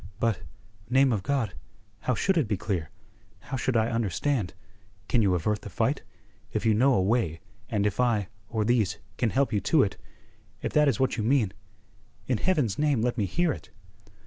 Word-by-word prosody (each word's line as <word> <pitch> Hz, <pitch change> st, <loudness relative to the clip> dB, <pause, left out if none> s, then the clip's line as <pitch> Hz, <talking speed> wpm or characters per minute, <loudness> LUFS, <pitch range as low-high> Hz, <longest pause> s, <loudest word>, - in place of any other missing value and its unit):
"But, 110 Hz, -6 st, +1 dB, 0.5 s
name 130 Hz, 0 st, +4 dB
of 105 Hz, -, 0 dB
God, 130 Hz, -4 st, -1 dB, 0.5 s
how 125 Hz, +3 st, 0 dB
should 190 Hz, -, +1 dB
it 155 Hz, -9 st, +2 dB
be 105 Hz, -2 st, 0 dB
clear? 90 Hz, -5 st, -2 dB, 0.5 s
How -, -, -6 dB
should 130 Hz, -1 st, 0 dB
I 110 Hz, +1 st, +2 dB
understand? 115 Hz, -, -1 dB, 0.5 s
Can 120 Hz, -, +3 dB
you 95 Hz, -4 st, +3 dB
avert 105 Hz, +4 st, 0 dB
the -, -, -8 dB
fight? -, -, 0 dB, 0.5 s
If -, -, -2 dB
you 110 Hz, -, +5 dB
know 130 Hz, +5 st, +4 dB
a -, -, +3 dB
way, 95 Hz, -6 st, +1 dB, 0.3 s
and 105 Hz, -2 st, 0 dB
if 105 Hz, +1 st, -1 dB
I, 115 Hz, -6 st, +2 dB, 0.2 s
or 110 Hz, -2 st, 0 dB
these, 110 Hz, -4 st, +2 dB, 0.2 s
can 120 Hz, -, +2 dB
help 130 Hz, 0 st, +1 dB
you 105 Hz, -, +3 dB
to 140 Hz, -, +4 dB
it 100 Hz, -, -2 dB, 0.7 s
if -, -, -2 dB
that 150 Hz, -1 st, +5 dB
is 130 Hz, -6 st, +1 dB
what 130 Hz, -1 st, +1 dB
you 110 Hz, -, -1 dB
mean 115 Hz, -4 st, +2 dB, 0.7 s
in 125 Hz, -5 st, 0 dB
Heaven's 135 Hz, -, +1 dB
name 145 Hz, -6 st, +2 dB
let 120 Hz, 0 st, +1 dB
me 105 Hz, -4 st, 0 dB
hear 175 Hz, -, +1 dB
it." -, -, -11 dB
115 Hz, 195 wpm, -27 LUFS, 105-130 Hz, 0.7 s, you